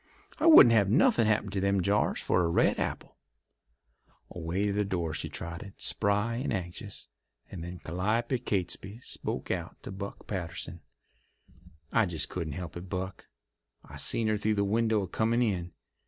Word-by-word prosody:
I 315 - +3
wouldn't 140 - +10
have 100 -4 +4
nothin' 140 - +4
happen 105 -2 +1
to 100 - -1
them 100 -1 +2
jars 100 +3 +1
for 90 - +2
a 85 - +1
red 85 - +3
apple." - - -4 1.1
Away 90 +4 -2
to 100 - +1
the 105 +1 +1
door 85 -5 -2
she - - -4
trotted, 85 +4 -7
spry 105 +3 +1
and 130 - -2
anxious, 95 +1 -5 0.4
and 85 -4 -6
then 90 +1 -6
Calliope 105 +10 -1
Catesby 95 0 -2
spoke - - -4
out - - -4
to - - -6
Buck 100 +1 -7
Patterson: 85 -3 -5 1.1
"I 115 -3 +3
just 85 -3 -2
couldn't 80 -5 -4
help 85 0 -6
it, 90 +1 -8
Buck. 95 0 -5 0.6
I - - -10
seen 115 - 0
her 110 0 +2
through 110 +1 +1
the 100 - +2
window 110 +1 +2
a - - -4
comin' 115 +6 +1
in. 90 -6 -1
100 Hz, 170 wpm, -29 LUFS, 90-110 Hz, 1.1 s, wouldn't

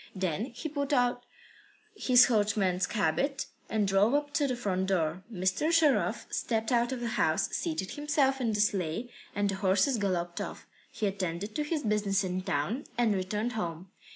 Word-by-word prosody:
Then 190 +2 -1
he 255 +4 -6
put 285 -1 -2
on 245 -2 +3 0.8
his 250 -11 +6
coachman's 205 -5 +1
habit, 275 +5 0 0.2
and 215 -2 +1
drove 200 +6 +3
up 290 0 -1
to 300 -2 +2
the 255 - -1
front 190 -5 -1
door. 175 -2 0
Mr. 190 - 0
Sharov 260 - +3
stepped 225 0 -1
out 240 0 +2
of 255 -2 -3
the 240 - -2
house, - - +2
seated 315 - -2
himself 290 -3 +1
in 230 -3 +1
the 210 - +1
sleigh, 205 +3 -1 0.2
and 205 0 +1
the 195 - -1
horses 195 +6 +2
galloped 175 -3 -1
off. - - -6 0.3
He 215 - -3
attended 195 0 -3
to 300 - -1
his 300 0 -2
business 210 -2 +1
in 185 0 -2
town 190 - -2
and 235 -3 +3
returned 210 +5 -2
home. 180 -4 -5
210 Hz, 175 wpm, -30 LUFS, 190-255 Hz, 0.8 s, his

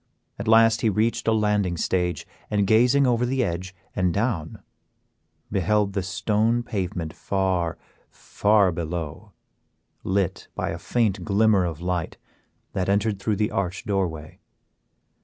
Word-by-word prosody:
At 100 - -5
last 115 0 +5
he 110 - +3
reached 115 +3 0
a - - +4
landing 105 -5 +1
stage, 90 +1 -1 0.2
and 105 -1 +1
gazing 125 +7 +4
over 120 -1 +2
the 130 +1 +1
edge 90 0 -4 0.2
and 90 -1 +1
down, 100 -6 -2 0.9
beheld 100 +2 +1
the 100 - 0
stone 105 +6 0
pavement 90 -7 -3
far, 90 +1 -1 0.3
far 100 -2 +2
below, 80 -2 -5 0.7
lit 95 -1 -1
by - - -2
a - - -5
faint 105 -6 0
glimmer 100 -1 +3
of 85 -2 -4
light 90 -2 -2 0.6
that 95 0 -1
entered 100 0 +1
through 105 +1 0
the 105 +1 0
arched 95 0 -2
doorway. 85 -6 -3
100 Hz, 135 wpm, -24 LUFS, 90-110 Hz, 0.9 s, last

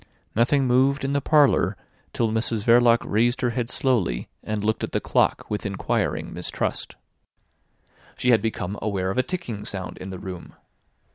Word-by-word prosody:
Nothing 130 +5 +3
moved 130 +3 +3
in 135 - -1
the 140 - +1
parlour 150 -1 +3 0.3
till 115 -2 0
Mrs 110 -1 0
Verloc 120 0 +5
raised 120 +4 +1
her 120 -2 +1
head 115 0 -2
slowly 105 - 0
and 105 -1 -3
looked 110 +1 0
at - - -4
the - - +2
clock - - +1
with 105 - -3
inquiring 100 -1 -2
mistrust. - - -3 1.2
She 125 - +2
had 115 - +5
become 105 -3 -3
aware 95 -3 -1
of 110 - -1
a - - +3
ticking 125 - -5
sound 95 -4 -6
in 95 - -7
the 95 - -6
room. 90 -1 -8
115 Hz, 165 wpm, -24 LUFS, 100-125 Hz, 1.2 s, Verloc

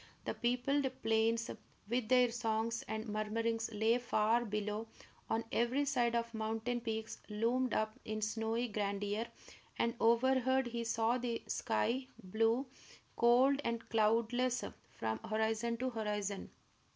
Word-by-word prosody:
The - - -1
peopled 250 +4 +1 0.2
plains, 225 +1 +2 0.4
with 235 0 -1
their 250 -2 +5
songs 230 -1 -1
and 220 +1 -3
murmurings, 225 +2 -1
lay 220 +3 +2
far 230 0 +2
below; 210 +1 -2 0.4
on 225 +1 +1
every 250 +5 +2
side 245 -4 +1
the 235 0 +1
mountain 225 +2 -2
peaks 220 -1 -4
loomed 235 +4 +1
up 215 0 -1
in 215 0 -3
snowy 225 +2 -1
grandeur; 205 +1 -2 0.5
and 235 - +1
overhead 260 +3 +3
he 235 -1 -3
saw 230 +2 +1
the 235 -2 -2
sky, 245 - 0 0.2
blue, 225 +7 +1 0.5
cold, 255 +4 +5
and 230 0 -2
cloudless, 230 +3 +2 0.3
from 110 -1 -2
horizon 220 - 0
to 255 +2 -1
horizon. 210 -3 -3
230 Hz, 125 wpm, -35 LUFS, 220-245 Hz, 0.5 s, their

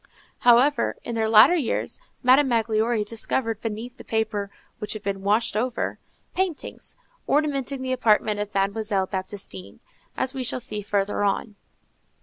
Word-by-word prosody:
However, 245 +5 +4
in 235 - -5
their 220 -1 0
latter 220 +9 +8
years, 280 -9 -2 0.2
Madame 265 +3 +6
Magloire 225 -1 +1
discovered 225 +1 -2
beneath 225 +3 -5
the - - -11
paper 215 -2 -1 0.3
which 210 - -3
had 215 -2 -7
been 195 -1 -3
washed 210 +3 +1
over, 240 +2 -1 0.3
paintings, 365 -5 -3 0.3
ornamenting 275 -3 0
the 260 0 -1
apartment 215 -3 +2
of 205 0 -3
Mademoiselle 200 0 0
Baptistine, 185 - -6 0.4
as 260 - 0
we 265 -1 -3
shall 245 +1 -2
see 210 -3 -3
further 205 0 -1
on. 205 +1 -1
220 Hz, 140 wpm, -24 LUFS, 205-250 Hz, 0.4 s, latter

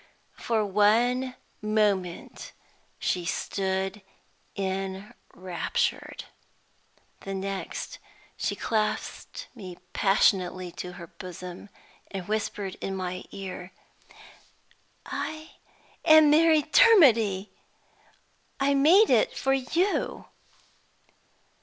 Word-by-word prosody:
For 225 -3 0
one 235 +6 +2 0.3
moment 205 -5 -1 0.4
she 180 - -1
stood 190 +2 -2 0.5
enraptured. 190 -2 -3 1.0
The 195 0 -6
next 195 0 -5 0.4
she - - -2
clasped 215 -2 -3
me 185 -7 -9 0.2
passionately 185 -2 +2
to 180 +1 -7
her 170 - -9
bosom, 180 +2 -9 0.4
and 190 -3 -6
whispered 205 -2 -3
in 195 - -3
my 185 -1 -4
ear: 185 -2 -8 1.3
"I 310 0 -6 0.5
am 310 -1 +7
Mary 315 0 +5
Dermody! 255 - +5 1.1
I 280 +1 +2
made 330 +10 +5
it - - +3
for 270 - +1
You!" 330 +9 0
205 Hz, 80 wpm, -27 LUFS, 190-260 Hz, 1.3 s, am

